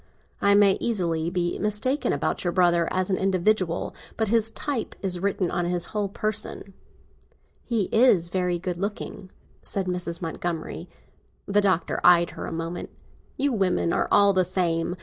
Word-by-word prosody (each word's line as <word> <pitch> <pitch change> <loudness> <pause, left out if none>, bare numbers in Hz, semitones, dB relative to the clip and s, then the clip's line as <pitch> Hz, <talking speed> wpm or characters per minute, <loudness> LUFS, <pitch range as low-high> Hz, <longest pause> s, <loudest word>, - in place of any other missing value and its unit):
I 200 0 +4
may 200 -1 +5
easily 170 -7 -1
be 175 -1 -2
mistaken 210 +7 0
about - - -1
your 175 - 0
brother 175 -2 +3
as 185 +1 -1
an 185 - +1
individual, 190 -2 0 0.2
but 220 -2 0
his 225 0 +2
type 255 0 -3
is 180 -2 0
written 190 -1 -1
on 175 -1 -1
his 175 0 +2
whole 205 -2 -1
person." 215 -1 -3 0.9
"He 230 -4 0
is 215 -8 +4
very 180 -1 0
good 175 0 -4
looking," 200 0 -5 0.3
said 195 -2 -2
Mrs. 180 -2 -3
Montgomery. 165 -1 -4 0.6
The 205 +1 +2
Doctor 190 -4 0
eyed 175 -1 +5
her - - -7
a - - -6
moment. 165 +1 -5 0.5
"You 280 -1 +1
women 185 -5 +1
are - - +1
all 200 -1 +5
the 185 -1 +3
same! 175 -2 -1
185 Hz, 160 wpm, -25 LUFS, 175-205 Hz, 0.9 s, may